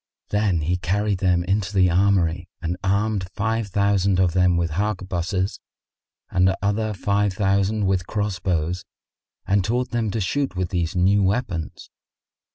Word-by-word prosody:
Then 105 -5 +1
he 85 +4 0
carried 100 +2 0
them 90 -2 +2
into 95 +1 -1
the 90 -2 +4
armoury 90 -2 +2
and 85 +1 -2
armed 100 -1 0
five 110 +1 -1
thousand 100 -1 +2
of 90 -3 +2
them 90 -1 +3
with 85 -1 0
harquebuses 95 0 -2 0.7
and 95 +1 +3
other 105 +2 -1
five 100 +1 0
thousand 100 +2 +1
with 95 -2 0
cross 105 -3 -2
bows 90 0 -1 0.6
and 100 0 +2
taught 120 +5 -1
them 115 -2 0
to 110 - -2
shoot 135 +5 -1
with 90 -1 -2
these 85 -1 -2
new 95 +3 +3
weapons. 95 -5 -2
95 Hz, 150 wpm, -23 LUFS, 90-105 Hz, 0.7 s, the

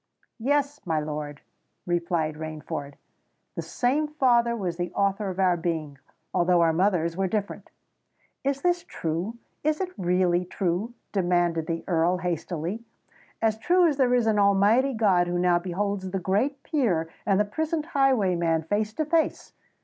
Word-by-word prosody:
"Yes—my 280 - 0
lord," 150 -1 -5 0.4
replied 170 -2 0
Rainford: 150 -2 -6 0.6
"the - - -4
same 280 +5 0
father 240 -5 +2
was 180 -6 -3
the 175 0 -3
author 200 0 0
of 185 0 -6
our 185 -2 +4
being—although 165 +2 -1
our 165 -1 +4
mothers 170 -2 +1
were 190 +1 0
different." 205 +1 -3 0.7
"Is 275 0 -1
this 350 -1 +2
true?—is 230 - -3
it 370 -1 -2
really 180 -1 +2
true?" 185 +6 -2 0.2
demanded 175 -4 +1
the 165 0 -3
Earl 175 +1 +2
hastily. 175 +3 -3 0.6
"As 220 -1 +2
true 355 +9 +4
as 300 -5 +2
there 250 -2 +3
is 240 -2 +2
an 215 -2 +2
Almighty 205 +7 +4
God 190 -5 +3
who 175 0 -1
now 175 -1 +3
beholds 190 +2 -2
the 195 - -2
great 230 +10 0
peer 215 - 0 0.2
and 195 -2 +2
the 210 - +3
prisoned 315 +8 -2
highwayman 190 - +2
face 210 +5 -1
to 310 - -1
face!" 320 +1 0
190 Hz, 145 wpm, -26 LUFS, 170-240 Hz, 0.7 s, our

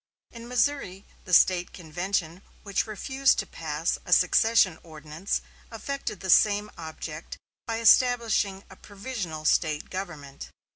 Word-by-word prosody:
In 235 0 -10
Missouri 245 -6 -1 0.2
the 185 - -9
State 180 +1 +4
convention 175 +1 -3 0.2
which 200 +1 -1
refused 265 +5 +1
to - - -1
pass 160 0 -3
a - - -9
secession 185 -2 +4
ordinance 155 +3 -5 0.3
effected 225 -3 -5
the 190 - -5
same 210 +2 +4
object 160 -1 -8 0.3
by 225 -1 -2
establishing 230 -4 +3
a - - -11
provisional 195 -7 -7
State 155 -1 +1
government. 155 -8 -7
190 Hz, 125 wpm, -26 LUFS, 160-225 Hz, 0.3 s, State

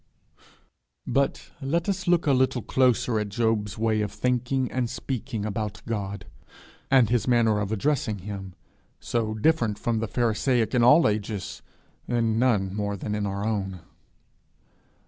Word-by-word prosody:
But 135 +2 -1
let 165 +5 -1
us 190 -2 -2
look 175 -1 +3
a 145 - +4
little 130 -1 +1
closer 125 -3 +2
at 105 -1 -3
Job's 110 -1 0
way 110 -1 +1
of 105 -1 -2
thinking 125 +3 0
and 125 -2 -1
speaking 115 -5 -4
about 105 0 -4
God, 100 -3 -4 0.6
and 130 -5 +4
his 120 0 +1
manner 115 -4 +3
of 105 0 -2
addressing 110 -1 0
him 95 -1 -7 0.4
so 110 -2 -2
different 115 -4 +1
from 115 +1 -1
the 115 - -2
pharisaic 120 +1 +1
in 125 - +3
all 150 +7 +7
ages, 105 -1 -3 0.5
in 115 -2 +1
none 105 -7 +2
more 100 -1 -2
than 105 +2 -4
in 105 -1 -1
our 100 +1 -3
own. 95 -5 -2
115 Hz, 145 wpm, -26 LUFS, 105-125 Hz, 0.6 s, all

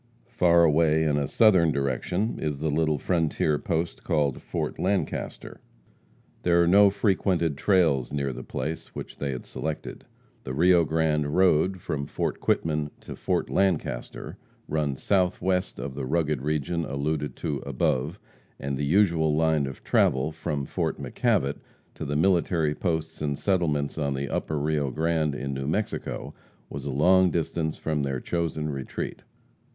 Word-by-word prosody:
Far 85 -1 +4
away 80 0 +4
in 75 -2 +2
a 70 -1 0
southern 95 -8 +4
direction 70 - -1
is 75 -3 -2
the 80 0 -1
little 80 0 +1
frontier 80 -3 0
post 85 -1 -2
called 75 -6 0
Fort - - -4
Lancaster. 95 +1 -2 0.8
There 85 0 +4
are - - +2
no 100 +3 +7
frequented 95 -6 +1
trails 80 -6 +2
near 70 -2 -1
the - - -7
place 75 +5 -5
which - - -8
they 70 - -2
had 65 -2 -5
selected. 80 -1 -5 0.4
The 65 - -5
Rio 85 +2 +5
Grande 80 -2 +1
road, 95 0 +3
from 70 -3 -3
Fort - - -2
Quitman 75 -2 0
to - - -8
Fort - - -1
Lancaster, 90 -10 -1 0.3
runs 75 -3 -2
southwest 90 -1 +1
of 70 - -5
the 65 -1 -4
rugged 75 -2 0
region 75 +3 -1
alluded 75 0 -2
to 70 - -3
above, 70 +5 -1 0.4
and 70 0 -3
the 70 - -1
usual 80 -2 +3
line 80 -3 +2
of 65 - -9
travel 65 +4 +2
from 75 -3 -3
Fort - - -2
McKavitt 70 +1 0 0.3
to - - -6
the 75 - -2
military 80 -2 +2
posts 80 -1 -3
and 70 -2 -1
settlements 80 -7 0
on 70 -2 0
the 70 +1 -3
Upper 80 - -2
Rio 75 -1 0
Grande, 80 +1 0
in 70 +1 -4
New 65 0 -4
Mexico, 100 +8 -3 0.4
was - - -6
a - - -2
long 90 +7 +4
distance 80 -1 -2
from 75 -2 -1
their 70 -2 -2
chosen 80 0 -2
retreat. 70 -2 -5
80 Hz, 155 wpm, -26 LUFS, 70-85 Hz, 0.8 s, no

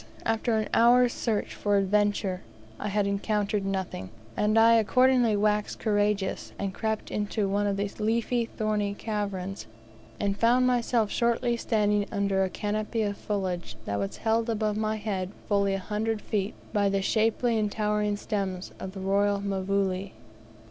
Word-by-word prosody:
after 225 0 +1
an 215 - -1
hour's 245 +1 +5
search 220 -3 -1
for 205 -1 +1
adventure, 200 -1 +1 0.4
I - - -3
had 205 0 +1
encountered 205 0 0
nothing, 190 - -3 0.3
and 210 +1 +2
I 225 +1 +7
accordingly 245 +1 +4
waxed 210 0 +1
courageous, 205 -2 0
and 195 -1 -3
crept 220 +2 -3
into 210 0 -1
one 205 +1 +1
of 200 -1 0
these 200 0 -3
leafy, 230 +2 +1
thorny 210 -2 -1
caverns, 200 - -4 0.5
and 200 -1 0
found 240 +4 +3
myself 240 -3 +1
shortly 235 0 +1
standing 210 -3 +1
under 200 -2 +1
a 190 - 0
canopy 215 +3 -2
of 205 -1 -1
foliage 185 - -3
that 100 0 -2
was 100 -1 -3
held 225 +1 +1
above 215 -2 0
my 215 0 0
head 200 -4 -3 0.2
fully 200 -1 +2
a - - 0
hundred 215 +3 -2
feet 205 -1 -2 0.2
by 200 -2 +3
the 195 0 0
shapely 225 +3 +2
and 210 -1 0
towering 210 -1 0
stems 195 -4 -3
of 190 - -6
the 195 - -7
royal 200 +1 +2
mvule. 195 -1 -1
210 Hz, 155 wpm, -27 LUFS, 200-220 Hz, 0.5 s, I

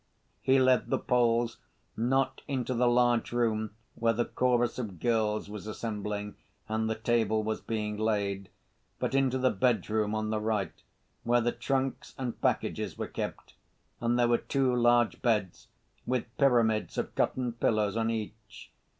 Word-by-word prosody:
He 135 +1 +4
led 130 -3 +3
the - - +2
Poles, 120 -1 +1 0.4
not 135 +4 +1
into 130 -3 -1
the 125 0 +2
large 120 -1 +3
room 110 -3 0 0.2
where 115 0 +1
the 120 +1 0
chorus 120 -1 +1
of 100 -8 -5
girls 110 -2 +1
was 105 0 -8
assembling 105 -2 -4 0.3
and 110 +1 -1
the 110 - 0
table 110 -1 +1
was 110 0 -2
being 105 -2 -3
laid, 100 -3 -1 0.5
but - - -2
into 135 -1 +2
the 130 0 +2
bedroom 110 -1 +1
on 110 0 -1
the 110 - 0
right, 105 -2 -1 0.5
where 120 +1 +3
the 120 0 +1
trunks 135 0 -2
and 125 -3 -4
packages - - -1
were - - -2
kept, - - -6 0.5
and 120 +1 +1
there 120 -1 +4
were 120 0 +3
two 135 -3 +1
large 120 -1 +3
beds, 105 -7 0 0.4
with 125 -2 -2
pyramids 120 -6 +3
of - - -2
cotton 125 -2 0
pillows 110 -3 +1
on 115 0 +1
each. 110 -1 -6
115 Hz, 155 wpm, -29 LUFS, 110-120 Hz, 0.5 s, He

